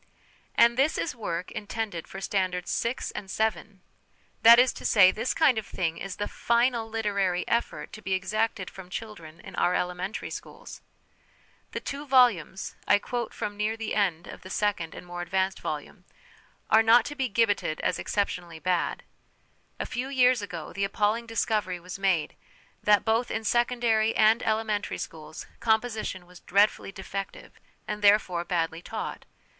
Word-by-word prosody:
And 235 +1 +5
this 280 +4 +2
is 295 - -2
work 180 -6 -4
intended 205 -5 -4
for 190 - -8
Standards 185 -2 -1
VI. 235 +2 0 0.2
and 195 - -6
VII.! 210 -2 -2 0.6
That 230 +1 +9
is 250 +1 +5
to - - -10
say, 185 -4 +6
this 220 +6 -2
kind 285 -8 +4
of 215 - -9
thing 165 -3 -2
is 195 -1 -5
the 205 - -3
final 235 -1 +1
literary 200 -5 0
effort 235 0 -1
to 215 - -9
be 190 -1 -2
exacted 195 +1 -1
from 190 -2 -11
children 180 -7 -8
in - - -10
our 180 - +2
elementary 180 +3 -3
schools! - - -9 0.9
The - - -2
two 285 +1 -6
volumes 240 - +3
(I - - +6
quote 240 +2 -4
from 205 - -4
near 215 +2 -1
the 225 -1 -3
end 180 -5 +1
of - - -10
the 185 - -11
second 195 -6 -1
and - - -9
more 175 0 -6
advanced 190 +2 -1
volume) - - -6 0.7
are 220 - +7
not 225 +1 +6
to 295 - -5
be 265 -3 -1
gibbeted 205 -7 +1
as - - 0
exceptionally 180 -5 -2
bad. 180 +1 -1 0.8
A - - -2
few 255 +2 -4
years 255 -3 +4
ago 180 -6 -7
the 195 - -2
appalling 210 +4 0
discovery 215 -5 -1
was 180 +2 -8
made 185 -6 +1 0.5
that, 210 -1 +4
both 225 +2 +1
in 225 - -2
secondary 235 -1 +2
and 220 +1 +5
elementary 215 -2 -1
schools, 155 -1 -8
'composition' 220 -5 0
was 180 0 -15
dreadfully 200 +1 +2
defective, 195 0 -7 0.3
and, 210 0 -4
therefore, 200 -4 +4
badly 165 -2 -1
taught. - - -6
205 Hz, 160 wpm, -27 LUFS, 185-225 Hz, 0.9 s, That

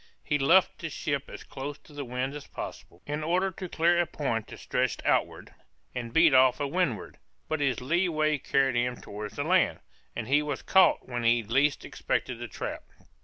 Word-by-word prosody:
He 145 -1 0
luffed 175 +7 +4
his 165 -3 -5
ship 140 -2 -2
as - - -9
close 140 +2 -6
to 150 - -19
the 145 -1 -5
wind 125 +2 -3
as 150 -1 -8
possible, 85 - -9
in 150 +1 -3
order 180 +4 +1
to 185 0 -7
clear 170 +2 +3
a 175 - -1
point 120 -9 -2
that - - -10
stretched - - -2
outward, - - 0 0.4
and 115 -1 -5
beat 160 +2 +5
off 130 -1 +6
to 145 - -1
windward, 140 - -2 0.3
but 155 - -1
his 135 -5 0
lee 170 +8 +1
way 155 -2 +1
carried 135 -2 +1
him 125 0 0
towards 105 0 -7
the - - -2
land, - - +2 0.4
and 115 - -4
he 145 +3 +4
was 145 -2 -4
caught 190 -1 +4
when 120 -1 -3
he 115 0 +3
least 135 +6 +1
expected 125 -2 -2
the 120 - -5
trap. 105 - -5
140 Hz, 200 wpm, -28 LUFS, 125-155 Hz, 0.4 s, off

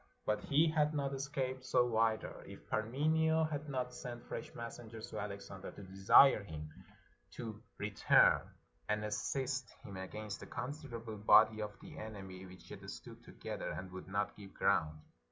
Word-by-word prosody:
But 105 0 +1
he 150 +4 +3
had 155 -1 +2
not 140 -1 0
escaped 135 -2 -2
so 120 -2 +2
either, 110 -1 +1
if - - -11
Parmenio 160 +8 +2
had 150 -1 -3
not 125 -2 -2
sent 120 -2 -7
fresh - - -5
messengers 115 -1 -7
to - - -4
Alexander, 100 -1 -6
to 100 - -10
desire 95 +6 +6
him 75 -5 -7 0.6
to 110 -3 -6 0.2
return 105 -1 +5 0.5
and 105 0 +1
assist 130 +4 -1
him 100 - -8
against 100 +2 -6
a - - -8
considerable 120 -5 -5
body 110 +1 +6
of 105 -1 -5
the - - -10
enemy 95 -4 -7
which 90 0 -14
yet - - -8
stood - - -9
together, - - -5
and 95 0 -5
would 95 0 -8
not 100 +2 -1
give 100 -2 -12
ground. 75 -1 +2
110 Hz, 155 wpm, -36 LUFS, 100-135 Hz, 0.6 s, desire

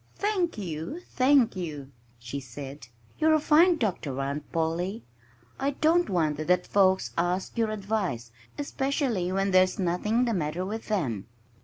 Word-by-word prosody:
"Thank 385 - 0
you! 175 - -5
Thank 260 -3 +4
you!" 150 -7 -5 0.3
she 120 +4 -6
said. 135 0 -9 0.3
"You're 315 0 +5
a - - +3
fine 330 +4 +5
doctor, 175 - -2
Aunt 140 +2 -4
Polly. 170 +6 -1 0.6
I 275 +1 +1
don't 335 +3 +3
wonder 155 -5 0
that 180 +2 +2
folks 190 -1 +2
ask 180 +2 -1
your 225 -2 +1
advice 200 - -2 0.3
especially 270 - -1
when 195 +1 0
there's 185 0 +4
nothing 205 +7 +1
the 235 - 0
matter 170 0 -2
with 220 +3 -5
them!" 130 - -1
185 Hz, 145 wpm, -27 LUFS, 155-240 Hz, 0.6 s, You're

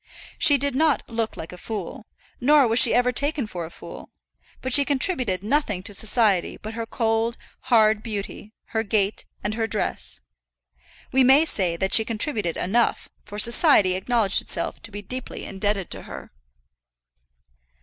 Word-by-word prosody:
She 285 - +6
did 280 0 0
not 300 +1 +1
look 225 -1 -4
like 160 - -8
a 180 - -11
fool, 220 +2 -7 0.3
nor 285 +1 +4
was 225 +2 +3
she 230 - +7
even 250 +1 +2
taken 285 0 -1
for 175 -5 -6
a - - -13
fool; - - -12 0.5
but 260 -1 -3
she 285 - +6
contributed 260 - 0
nothing 210 -6 -1
to 205 - -6
society 210 -3 +1
but 215 +1 -8
her 230 0 -5
cold, 225 0 -1 0.3
hard 220 -3 +4
beauty, 210 -1 -7 0.2
her 220 - -1
gait, 205 -1 -1 0.2
and 205 +1 -2
her 225 0 -2
dress. 125 - -2 0.9
We 265 0 +3
may 270 +5 +5
say 180 - 0
that 190 +2 -2
she 220 - +6
contributed 215 - -2
enough, 230 +6 0 0.2
for 205 - -9
society 230 - +4
acknowledged 200 +1 +3
itself - - -3
to - - -10
be 205 0 -8
deeply 255 +5 -7
indebted 195 -1 -3
to - - -1
her. - - -11
225 Hz, 160 wpm, -23 LUFS, 205-255 Hz, 0.9 s, she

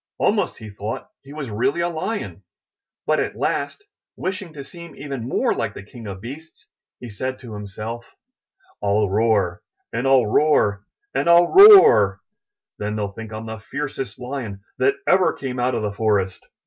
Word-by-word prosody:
Almost - - +1
he 110 -1 -10
thought 105 - -6
he 135 - -14
was 145 -5 -6
really 120 +9 0
a 170 - +1
Lion. 175 +6 -4 0.6
But - - +2
at - - -2
last, 410 - -2 0.3
wishing 185 -2 -4
to 140 -2 -8
seem 170 +4 -12
even 135 -4 -6
more - - +1
like - - -3
the - - -8
King 115 +2 -11
of 95 -1 -7
Beasts, 150 +7 -10 0.3
he 125 - -8
said 130 +5 -4
to 120 -4 -10
himself: 105 +3 -7 0.7
'I'll 105 +1 +2
roar, 105 -3 +1 0.3
and 120 +4 -1
FU 135 -2 +5
roar, 105 -5 +2 0.3
and - - 0
ril 170 0 +6
roar! 245 - +8 0.6
Then 105 +1 -3
they 105 - -2
II 100 -1 -5
think 115 -1 -8
Fm 110 0 -7
the 110 0 -6
fiercest 135 +4 -5
Lion 125 -6 -6 0.2
that 405 - +3
ever 185 -1 +4
came 130 -2 -5
out 125 +1 +1
of 115 - -2
the 105 -1 -2
Forest. 100 -3 0
120 Hz, 175 wpm, -22 LUFS, 105-145 Hz, 0.7 s, roar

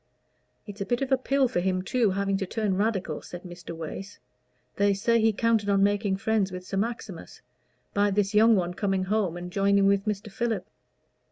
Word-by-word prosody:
"It's 205 -1 -9
a - - -1
bit 245 +2 0
of 270 - -4
a 265 - +5
pill 270 0 +2
for 235 - -1
him, 185 0 0
too, 230 +2 +1
having 195 +1 0
to 195 -1 -3
turn 210 -1 -1
Radical," 190 -6 -1
said 175 0 -9
Mr. 175 -2 -9
Wace. 190 +5 -7 0.6
"They 200 0 +3
say 230 +3 +2
he 220 0 +4
counted 220 -1 +1
on 195 -1 +3
making 205 -1 +1
friends 215 -2 0
with 180 0 -7
Sir 195 - -4
Maximus, 230 +4 -5 0.5
by 205 0 +3
this 200 0 0
young 220 +2 +6
one 180 -2 0
coming 195 0 0
home 190 -3 0
and 180 0 -7
joining 200 +1 +3
with 200 0 +2
Mr. 210 -1 -3
Philip." 225 -4 -2
200 Hz, 195 wpm, -27 LUFS, 190-220 Hz, 0.6 s, young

